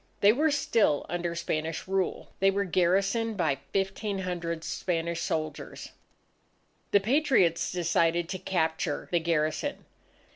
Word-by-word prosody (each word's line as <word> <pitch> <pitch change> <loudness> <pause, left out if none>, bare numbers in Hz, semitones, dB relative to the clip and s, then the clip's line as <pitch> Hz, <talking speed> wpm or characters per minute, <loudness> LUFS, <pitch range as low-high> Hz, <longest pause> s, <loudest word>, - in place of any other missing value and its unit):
They 205 +1 +7
were 305 +6 +2
still 225 - +2
under 175 0 -2
Spanish 160 -1 -3
rule. 190 -1 -1
They 195 - +5
were 200 +1 +1
garrisoned 195 +5 +1
by 150 -7 +1
1500 185 -4 -2
Spanish 170 -1 -2
soldiers. 155 -2 -4 1.0
The 200 - +5
Patriots 225 - +2
decided 170 -1 +1
to 185 - -3
capture 160 -4 -1
the 175 - +3
garrison. 165 - -1
175 Hz, 115 wpm, -28 LUFS, 165-195 Hz, 1.0 s, They